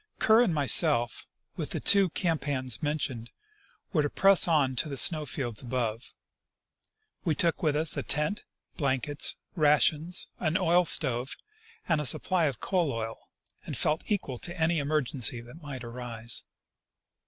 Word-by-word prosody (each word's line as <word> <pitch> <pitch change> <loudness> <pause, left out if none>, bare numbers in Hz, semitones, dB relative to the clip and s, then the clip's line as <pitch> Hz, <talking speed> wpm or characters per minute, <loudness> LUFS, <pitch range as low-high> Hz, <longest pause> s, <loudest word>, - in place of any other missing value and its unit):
Kerr 220 +1 +4
and 235 -7 +2
myself, 120 -5 +3 0.3
with - - -5
the - - -4
two 200 -2 +4
camp 165 -4 -2
hands 130 -5 -4
mentioned, 140 -6 -3 0.6
were 155 - +2
to 145 - -1
press 195 +2 +4
on 145 -6 +1
to 155 - +2
the 140 - -5
snow 155 +1 +4
fields 120 -5 -3
above. 120 -2 -4 1.1
We 160 -5 0
took 170 +2 +1
with 150 -3 0
us 155 +1 +2
a - - -1
tent, 150 +8 0 0.3
blankets, 140 0 0 0.2
rations, 155 +2 +1
an 160 0 0
oil 180 -1 +2
stove, 130 -5 +2 0.5
and 160 -3 +1
a 150 - +4
supply 175 +5 +2
of 135 -7 -3
coal 175 -6 -1
oil, 115 -1 -7 0.3
and - - -6
felt 155 +1 0
equal 145 - -3
to 175 0 -6
any 165 0 +1
emergency 140 -5 0
that 120 +8 -14
might 140 -4 -8
arise. 120 -1 -3
150 Hz, 155 wpm, -27 LUFS, 125-165 Hz, 1.1 s, Kerr